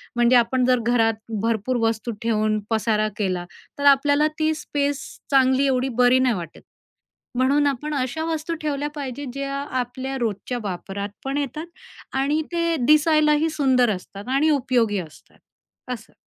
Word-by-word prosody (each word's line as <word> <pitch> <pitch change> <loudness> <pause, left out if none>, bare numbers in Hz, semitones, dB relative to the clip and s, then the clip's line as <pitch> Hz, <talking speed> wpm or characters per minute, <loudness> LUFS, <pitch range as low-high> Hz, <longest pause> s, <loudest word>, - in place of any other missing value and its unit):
म्हणजे 240 +1 +4
आपण 245 +2 +2
जर 250 -1 +3
घरात 225 -2 +3 0.3
भरपूर 230 +2 0
वस्तू 225 +1 -2
ठेवून, 215 -1 +1
पसारा 220 -1 +1
केला, 185 -4 -1 0.3
तर 285 - -2
आपल्याला 285 +2 +2
ती 315 0 +2
स्पेस 285 -2 -2 0.2
चांगली 265 0 +4
एवढी 260 0 +1
बरी 250 +1 +5
नाही 255 -4 +2
वाटत. 170 -3 -8 0.8
म्हणून 280 +3 +3
आपण 295 +3 -2
अशा 265 +4 -2
वस्तू 325 0 -2
ठेवल्या 295 -1 -2
पाहिजेत, 275 0 -5
ज्या 275 0 -4 0.2
आपल्या 260 +2 -4
रोजच्या 235 +2 -2
वापरात 200 +1 -4 0.2
पण 275 +1 -1
येतात 300 +4 -3 0.5
आणि 290 +3 +1
ते 335 -1 +1
दिसायलाही 305 +1 +4
सुंदर 260 -5 +3
असतात 200 +4 -10
आणि 305 +3 +3
उपयोगी 240 -7 +1
असतात, 160 -4 -12 0.6
असं. 225 -2 -11
260 Hz, 145 wpm, -23 LUFS, 225-290 Hz, 0.8 s, बरी